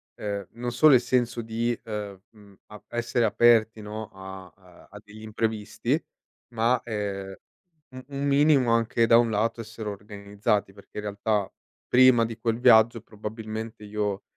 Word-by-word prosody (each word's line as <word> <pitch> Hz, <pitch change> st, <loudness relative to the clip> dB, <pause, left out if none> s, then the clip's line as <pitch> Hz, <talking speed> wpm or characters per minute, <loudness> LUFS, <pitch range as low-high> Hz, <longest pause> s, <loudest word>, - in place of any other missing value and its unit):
ehm, 100 Hz, -2 st, -4 dB
non 120 Hz, 0 st, -4 dB
solo 150 Hz, +2 st, +6 dB
il -, -, +6 dB
senso 120 Hz, -2 st, 0 dB
di, 115 Hz, +1 st, -2 dB
ehm, 105 Hz, -3 st, -6 dB
mhmm, 105 Hz, -3 st, -19 dB
ap 105 Hz, -1 st, -15 dB
essere 120 Hz, 0 st, -1 dB
aperti, 110 Hz, -1 st, +3 dB
no, 110 Hz, +1 st, -7 dB
a, 95 Hz, -2 st, -10 dB
uhm, 90 Hz, -3 st, -20 dB
a 105 Hz, -, -11 dB
degli 110 Hz, +1 st, -14 dB
imprevisti, 110 Hz, -1 st, -2 dB, 0.5 s
ma, 115 Hz, +2 st, +1 dB
ehm, 100 Hz, -3 st, -4 dB, 0.6 s
u 130 Hz, 0 st, -10 dB
un 140 Hz, 0 st, -4 dB
minimo 140 Hz, -3 st, +4 dB
anche 115 Hz, 0 st, +2 dB
da 115 Hz, -, +7 dB
un 120 Hz, -1 st, +3 dB
lato 110 Hz, +2 st, -1 dB
essere 110 Hz, -1 st, -8 dB
organizzati, 100 Hz, 0 st, -3 dB
perché 100 Hz, -, -16 dB
in 105 Hz, -, -4 dB
realtà 105 Hz, 0 st, -1 dB, 0.4 s
prima 125 Hz, -2 st, +5 dB
di 115 Hz, 0 st, -6 dB
quel 115 Hz, 0 st, -1 dB
viaggio 115 Hz, 0 st, +5 dB
probabilmente 110 Hz, 0 st, -7 dB
io, 105 Hz, -1 st, -3 dB
110 Hz, 155 wpm, -26 LUFS, 105-115 Hz, 0.6 s, da